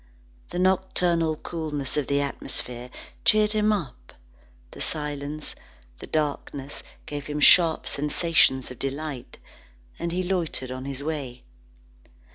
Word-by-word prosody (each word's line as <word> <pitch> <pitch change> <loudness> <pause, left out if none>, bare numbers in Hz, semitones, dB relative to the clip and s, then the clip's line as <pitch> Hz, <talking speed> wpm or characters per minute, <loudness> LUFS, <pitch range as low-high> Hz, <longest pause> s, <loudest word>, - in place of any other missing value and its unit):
The - - -4
nocturnal 180 -3 +2
coolness 150 -4 -4
of 150 -3 0
the 140 0 +2
atmosphere 125 -3 -4 0.3
cheered 215 0 +5
him 215 0 +3
up; 170 -12 -4 0.6
the - - -10
silence, 150 0 -3 0.5
the - - -8
darkness 145 -2 -2 0.2
gave 145 -1 -5
him 150 0 -2
sharp 165 +1 +6
sensations 145 -3 +3
of 125 - -10
delight, 135 -1 -4 0.6
and 170 0 -2
he 180 +2 0
loitered 170 -8 -1
on 130 +1 -5
his 140 0 -5
way. 140 -6 -4
150 Hz, 120 wpm, -26 LUFS, 140-170 Hz, 0.6 s, sharp